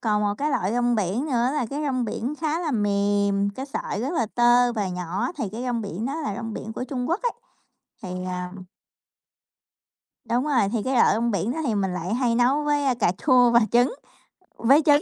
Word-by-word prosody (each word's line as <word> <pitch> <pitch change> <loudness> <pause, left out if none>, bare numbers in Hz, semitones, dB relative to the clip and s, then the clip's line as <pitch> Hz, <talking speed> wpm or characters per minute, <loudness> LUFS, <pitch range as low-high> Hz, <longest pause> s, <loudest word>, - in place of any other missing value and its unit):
còn 210 -2 +1
một 205 0 0
cái 295 +2 0
loại 195 -6 0
rong 240 0 +1
biển 210 - -1
nữa 250 -3 +1
là 255 -6 0
cái 295 +2 -3
rong 255 -3 0
biển 245 +6 -3
khá 320 +1 0
là 320 -4 -2
mềm, 200 -2 +1
cái 265 +1 -5
sợi 270 - -4
rất 270 +8 -2
là 235 -9 0
tơ 240 0 +4
và 210 -4 -2
nhỏ 180 - -3
thì 225 -8 -2
cái 235 +3 -5
rong 245 -2 -1
biển 205 +2 -4
đó 275 - -3
là 210 -10 -3
rong 225 -1 -5
biển 220 - -6
của 250 - -4
Trung 255 -1 -4
Quốc 345 +6 0
ấy, 485 - 0 0.7
thì 185 -1 -5
à 180 0 -4 1.8
Đúng 245 +4 +1
rồi, 245 -9 +2
thì 220 -3 0
cái 260 0 -1
loại 235 - +5
trong 235 +2 0
biển 200 +2 -1
đó 320 - -5
thì 225 - 0
mình 190 -2 0
lại 180 +3 -3
hay 245 -2 +1
nấu 255 +5 +3
với 290 -3 +1
cà 205 -7 +1
chua 250 -3 +6
và 235 0 +5
trứng 245 - +3 0.6
với 275 +7 +5
trứng, 290 -1 +5
235 Hz, 220 wpm, -24 LUFS, 205-265 Hz, 1.8 s, chua